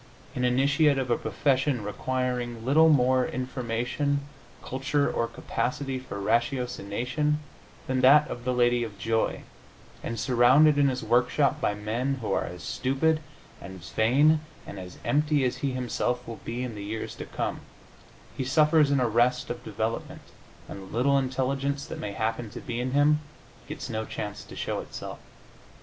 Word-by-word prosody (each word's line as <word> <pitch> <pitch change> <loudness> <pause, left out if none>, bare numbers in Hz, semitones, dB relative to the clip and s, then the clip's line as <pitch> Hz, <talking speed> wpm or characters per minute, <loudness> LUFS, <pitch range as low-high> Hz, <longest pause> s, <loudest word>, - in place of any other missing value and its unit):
An 125 - -2
initiate 140 +4 +3
of 130 -2 -1
a - - +5
profession 130 -3 0
requiring 120 +2 -2
little 160 +5 +6
more 130 -3 +4
information, 130 +3 -2 0.4
culture 140 +2 0
or 115 - 0
capacity 130 +3 -3
for 125 -6 -7
ratiocination 125 +5 0 0.5
than 130 0 0
that 145 +4 +7
of 120 - -6
the 125 - 0
lady 120 -1 +3
of 105 -3 -7
joy, 110 +3 -1 0.6
and 115 -1 -4
surrounded 130 +5 +5
in 140 - +5
his 130 -1 -1
work 120 +1 +3
shop 140 -2 +1
by 105 - +1
men 115 +6 -1
who 120 -5 -4
are - - 0
as 90 0 -8
stupid, 155 +5 +1 0.4
as 85 -2 -10
vain 145 +8 +4 0.3
and 100 - -8
as 90 -1 -9
empty 150 -1 +2
as 125 - -1
he 140 -2 -2
himself 125 0 -2
will 115 - -7
be 120 +2 -4
in 125 -2 -4
the 105 -1 -7
years 110 +2 -4
to - - -6
come, - - -3 0.7
he - - -2
suffers 150 +2 +4
an 140 -1 +3
arrest 125 +2 +2
of 120 - -6
development, 110 +2 -4 0.4
and 100 - -8
the 95 +4 -7
little 140 +3 +4
intelligence 135 +2 -1
that - - -7
may 100 -1 -4
happen 115 +2 -2
to - - -8
be 120 -1 -4
in 130 +1 -2
him 145 +1 +4 0.5
gets - - -6
no 110 -1 -3
chance 105 -1 -6
to - - -12
show - - -2
itself. - - -7
125 Hz, 165 wpm, -27 LUFS, 115-140 Hz, 0.7 s, that